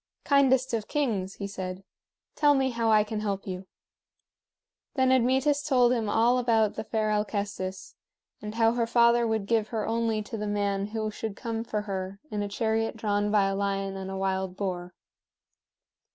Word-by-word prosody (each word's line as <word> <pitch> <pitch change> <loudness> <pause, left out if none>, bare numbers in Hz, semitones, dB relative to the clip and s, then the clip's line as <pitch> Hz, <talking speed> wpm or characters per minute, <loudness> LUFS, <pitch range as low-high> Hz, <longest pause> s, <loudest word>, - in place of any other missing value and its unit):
"Kindest 265 -3 +3
of 220 -2 -1
kings," 210 -10 -1
he 200 - -5
said, 190 -1 -6 0.5
"tell 290 -1 +4
me 265 -1 +1
how 230 -1 0
I 215 -1 +5
can 215 0 -4
help 200 -2 -3
you." 185 0 -6 1.3
Then 260 -2 +3
Admetus 265 +3 +3
told 250 -4 +3
him 225 -4 -1
all 235 +4 +3
about 225 -4 +2
the 220 - -5
fair 215 -1 -1
Alcestis, 200 -3 -3 0.5
and 210 +1 -6
how 225 -1 +4
her 235 -1 0
father 235 0 +4
would 220 -2 -1
give 220 0 +1
her 220 -2 -3
only 225 -1 0
to 225 +2 -6
the 210 0 -3
man 200 -1 -1
who 215 0 -3
should 215 -1 -5
come 225 +1 -4
for 215 -2 -2
her 195 -1 -5
in 210 - -2
a 205 - -2
chariot 225 +2 -1
drawn 205 -1 0
by 205 -1 +4
a 195 0 0
lion 195 -1 -1
and 190 0 -5
a 195 - -4
wild 190 -1 -2
boar. 180 -3 -4
215 Hz, 180 wpm, -27 LUFS, 200-235 Hz, 1.3 s, I